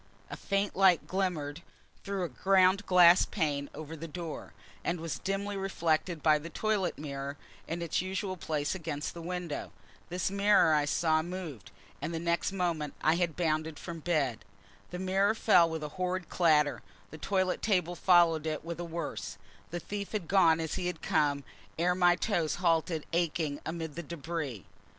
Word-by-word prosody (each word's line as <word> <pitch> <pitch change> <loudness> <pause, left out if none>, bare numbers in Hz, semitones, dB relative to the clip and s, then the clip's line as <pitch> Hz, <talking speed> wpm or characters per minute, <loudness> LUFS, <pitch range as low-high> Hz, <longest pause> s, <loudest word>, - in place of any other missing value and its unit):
A - - -4
faint 200 0 -1
light 190 -3 +5
glimmered 170 -5 -2 0.4
through 195 -2 -2
a - - -1
ground 190 - +3
glass 180 -1 +7
pane 145 -6 -1
over 155 +2 -7
the 165 +1 -7
door; 165 0 -6 0.3
and 170 0 -1
was 165 -1 -4
dimly 200 +1 -2
reflected 170 -4 -1
by 155 -1 +5
the 165 +3 -8
toilet 210 -1 -1
mirror, 140 -1 -5 0.3
in 170 +1 -3
its 170 - 0
usual 190 +1 -3
place 155 -4 -2
against 160 -5 -4
the 170 - -8
window. 175 -2 -4 0.4
This 180 +2 -1
mirror 200 -4 +4
I 150 -1 +3
saw 155 +1 +2
moved, 165 - -7 0.3
and 155 +4 -3
next 170 +1 +1
moment 170 -6 -2
I 155 - +5
had 170 -4 0
bounded 155 -2 -1
from 170 -2 -7
bed. 145 -8 0 0.5
The 180 - -5
mirror 190 +3 +2
fell 180 -7 +5
with 160 -1 -4
a 150 - -4
horrid 185 -1 -2
clatter: 150 -4 +3 0.3
the 155 - -9
toilet 185 +2 0
table 180 -5 +1
followed 170 -3 +4
it 155 0 -3
with 170 0 -5
a - - -3
worse: 170 -2 -5 0.3
the 175 - -4
thief 200 +4 -6
had 200 -6 -2
gone 165 -4 +5
as 160 -1 -3
he 180 -2 -2
had 180 -3 -5
come 145 -2 +1 0.3
ere 175 +2 +2
my 175 -1 +4
toes 170 -7 0
halted 165 -2 +1
aching 160 -3 0
amid 160 -1 -4
the 170 - -5
debris. 155 - -5
170 Hz, 170 wpm, -30 LUFS, 155-185 Hz, 0.5 s, glass